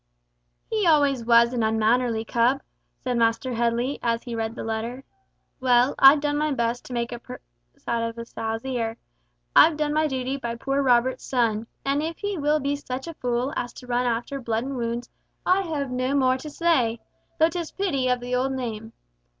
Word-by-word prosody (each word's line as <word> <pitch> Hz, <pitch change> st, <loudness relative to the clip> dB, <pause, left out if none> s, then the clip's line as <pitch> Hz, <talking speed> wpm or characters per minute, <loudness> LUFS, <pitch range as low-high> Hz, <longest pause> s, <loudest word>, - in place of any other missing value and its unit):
"He 430 Hz, -5 st, 0 dB
always 285 Hz, -6 st, +3 dB
was 235 Hz, +1 st, +5 dB
an 240 Hz, -, 0 dB
unmannerly 225 Hz, +1 st, +1 dB
cub," 245 Hz, +5 st, +1 dB, 0.4 s
said 250 Hz, -2 st, -1 dB
Master 230 Hz, +2 st, +1 dB
Headley, 235 Hz, +3 st, 0 dB
as 230 Hz, -1 st, 0 dB
he 240 Hz, -, -6 dB
read 225 Hz, 0 st, -3 dB
the -, -, -5 dB
letter. 225 Hz, +4 st, -4 dB, 0.6 s
"Well, 250 Hz, 0 st, +4 dB
I've 275 Hz, +2 st, +8 dB
done 290 Hz, 0 st, 0 dB
my 305 Hz, 0 st, 0 dB
best 235 Hz, -1 st, -1 dB
to 255 Hz, -, -8 dB
make 235 Hz, 0 st, -2 dB
a 240 Hz, -1 st, -6 dB
silk 250 Hz, +1 st, -9 dB, 0.4 s
purse -, -, -30 dB
of 230 Hz, 0 st, -2 dB
a 230 Hz, -, -6 dB
sow's 225 Hz, +1 st, -4 dB
ear! 235 Hz, -3 st, -2 dB, 0.6 s
I've 315 Hz, -2 st, +7 dB
done 300 Hz, -1 st, 0 dB
my 310 Hz, 0 st, +2 dB
duty 265 Hz, -1 st, -2 dB
by 235 Hz, -3 st, -4 dB
poor 275 Hz, +4 st, -1 dB
Robert's 255 Hz, -1 st, +2 dB
son, 230 Hz, -3 st, 0 dB, 0.2 s
and 280 Hz, +1 st, +1 dB
if 325 Hz, +1 st, -4 dB
he 405 Hz, -1 st, -3 dB
will 300 Hz, -1 st, +1 dB
be 280 Hz, 0 st, -1 dB
such 265 Hz, -2 st, -5 dB
a 335 Hz, -, -5 dB
fool 250 Hz, 0 st, -2 dB
as 245 Hz, -, -3 dB
to -, -, -11 dB
run 245 Hz, 0 st, 0 dB
after 240 Hz, +4 st, -2 dB
blood 230 Hz, -1 st, -1 dB
and 275 Hz, +1 st, -4 dB
wounds, 235 Hz, 0 st, -3 dB, 0.4 s
I 370 Hz, +2 st, +4 dB
have 285 Hz, -5 st, -3 dB
no 255 Hz, +2 st, 0 dB
more 260 Hz, -2 st, +3 dB
to 305 Hz, -, -7 dB
say! 270 Hz, -9 st, +1 dB, 0.4 s
Though 320 Hz, +1 st, +4 dB
'tis 340 Hz, -2 st, -4 dB
pity 285 Hz, -10 st, -1 dB
of 250 Hz, -1 st, +1 dB
the 245 Hz, +1 st, -5 dB
old 260 Hz, +2 st, +1 dB
name! 225 Hz, -3 st, -5 dB
250 Hz, 200 wpm, -25 LUFS, 235-280 Hz, 0.6 s, I've